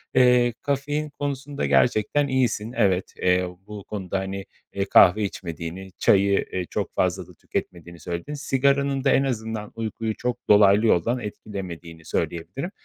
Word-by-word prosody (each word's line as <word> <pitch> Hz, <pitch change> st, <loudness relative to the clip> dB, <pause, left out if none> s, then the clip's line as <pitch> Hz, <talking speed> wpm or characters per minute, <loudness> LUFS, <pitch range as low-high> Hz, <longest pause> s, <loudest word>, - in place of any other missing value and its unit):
Eee, 125 Hz, -2 st, +5 dB
kafein 145 Hz, +2 st, -2 dB
konusunda 140 Hz, -, -3 dB
gerçekten 105 Hz, -, +2 dB
iyisin. 125 Hz, -4 st, 0 dB
Evet, 95 Hz, -5 st, +1 dB
eee, 90 Hz, 0 st, +2 dB, 0.2 s
bu 105 Hz, -1 st, -8 dB
konuda, 95 Hz, -2 st, -4 dB
hani, 95 Hz, 0 st, -5 dB, 0.3 s
eee, 100 Hz, 0 st, -1 dB
kahve 95 Hz, +2 st, +6 dB
içmediğini, 90 Hz, 0 st, -6 dB
çayı, 100 Hz, 0 st, +3 dB
eee, 90 Hz, -1 st, -2 dB
çok -, -, -3 dB
fazla -, -, 0 dB
da -, -, -15 dB
tüketmediğini 85 Hz, -1 st, -6 dB
söyledin. 85 Hz, -, -5 dB
Sigaranın 140 Hz, -1 st, +1 dB
da 140 Hz, -, +3 dB
en 135 Hz, -, +4 dB
azından 110 Hz, -4 st, -3 dB
uykuyu 110 Hz, 0 st, -3 dB
çok 125 Hz, 0 st, -2 dB
dolaylı 105 Hz, +1 st, +6 dB
yoldan 115 Hz, +7 st, +2 dB
etkilemediğini 90 Hz, -7 st, -8 dB
söyleyebilirim. 130 Hz, -, -3 dB
105 Hz, 140 wpm, -24 LUFS, 95-130 Hz, 0.3 s, kahve